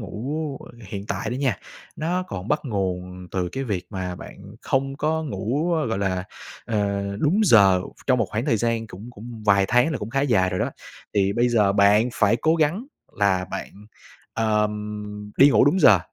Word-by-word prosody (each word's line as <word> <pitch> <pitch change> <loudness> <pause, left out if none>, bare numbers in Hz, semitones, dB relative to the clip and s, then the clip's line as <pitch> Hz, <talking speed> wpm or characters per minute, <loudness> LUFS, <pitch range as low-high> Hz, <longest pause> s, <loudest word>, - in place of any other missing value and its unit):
ngủ 135 - -4 0.3
hiện 100 +1 -6
tại 100 +3 -3
đó 125 - -2
nha, 130 -6 0 0.4
nó 175 +4 -1
còn 100 - -7
bắt 150 - +1
nguồn 90 -5 -3
từ 90 -2 -1
cái 135 0 -3
việc 95 -6 -3
mà 95 -3 -4
bạn 100 +2 -11
không 135 +1 -1
có 160 +1 -1
ngủ, 140 - -1 0.2
gọi 110 - -1
là, 95 -2 -1 0.4
ờ, 100 -2 -1 0.2
đúng 175 +9 +2
giờ 100 - +6 0.2
trong 130 -2 +3
một 115 - +1
khoảng 110 +3 -2
thời 130 -7 +2
gian 115 0 -1
cũng 110 +4 -10
cũng 115 0 -10
vài 100 -1 +5
tháng 125 +6 +3
là - - -2
cũng 105 +2 -6
khá 135 +1 0
dài 100 -10 +2
rồi 90 - -2
đó, - - 0 0.4
thì 100 -1 +2
bây 120 +3 +2
giờ 105 -5 +3
bạn 100 +3 +4
phải 110 +3 +3
cố 160 +7 +2
gắng 165 - 0 0.3
là 95 -3 +2
bạn, - - -5 0.6
ờm, 105 -1 -2
đi 140 +1 +7
ngủ - - +5
đúng 170 +6 +3
giờ. 105 -9 +7
110 Hz, 190 wpm, -23 LUFS, 100-135 Hz, 0.6 s, đi